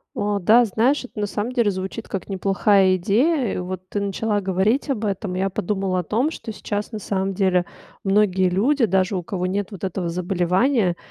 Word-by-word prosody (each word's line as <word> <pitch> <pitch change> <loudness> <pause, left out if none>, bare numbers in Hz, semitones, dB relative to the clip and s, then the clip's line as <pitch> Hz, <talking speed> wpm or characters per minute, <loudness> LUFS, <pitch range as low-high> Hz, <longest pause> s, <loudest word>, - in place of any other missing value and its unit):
О 205 0 0
да, 225 +7 +6
знаешь, 235 +7 +1
это 235 -3 -8
на 205 - 0
самом 210 +4 -3
деле 235 -5 +2
звучит 190 +4 -5
как 195 - -5
неплохая 195 0 +3
идея. 235 - +1
Вот 185 0 -5
ты 205 - -2
начала 205 +1 -1
говорить 195 +9 +1
об 225 -5 -1
этом. 195 -2 -2
Я 190 +1 0
подумала 190 0 -1
о - - -3
том, 235 - 0
что 260 - -8
сейчас 205 +1 -4
на 215 - -4
самом 195 -1 -2
деле 185 -2 +2 0.4
многие 195 -2 +3
люди, 235 +8 +2
даже 190 0 +1
у 180 - -2
кого 180 +1 -3
нет 195 +1 -2
вот 195 -2 -7
этого 185 -1 -2
заболевания, 180 +4 +1
195 Hz, 190 wpm, -22 LUFS, 185-215 Hz, 0.4 s, да